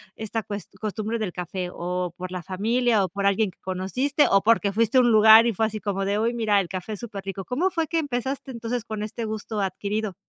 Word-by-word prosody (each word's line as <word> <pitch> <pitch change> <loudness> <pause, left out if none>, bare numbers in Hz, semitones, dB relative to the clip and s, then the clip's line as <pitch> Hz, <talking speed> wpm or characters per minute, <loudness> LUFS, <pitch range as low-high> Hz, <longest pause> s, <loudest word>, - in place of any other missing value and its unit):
esta 220 0 -4
cues 205 -1 -6
costumbre 215 +2 -2
del 205 -5 -3
café 180 0 -4
o 180 0 -3
por 185 0 -6
la 180 -1 -4
familia 220 +3 +1
o - - -6
por 200 +2 -3
alguien 200 0 +2
que - - -33
conociste 220 +11 0
o 195 0 +4
porque 215 -2 +3
fuiste 230 +3 +2
a 255 - +8
un 240 - +4
lugar 220 +1 +8
y 235 - +1
fue 220 +3 +1
así 215 0 -5
como 195 -2 -2
de, 200 +1 0
uy, 230 +2 +1
mira, 215 -4 +2
el 185 - -1
café 185 +4 -5
es 205 - -7
superrico, 195 -4 -6
¿cómo 320 +10 0
fue 330 -4 -1
que 330 - 0
empezaste, 265 -1 -3
entonces, 235 0 -3
con 215 -2 -4
este 225 +2 -4
gusto 215 0 -4
adquirido? 200 +1 -2
215 Hz, 235 wpm, -25 LUFS, 195-230 Hz, -, a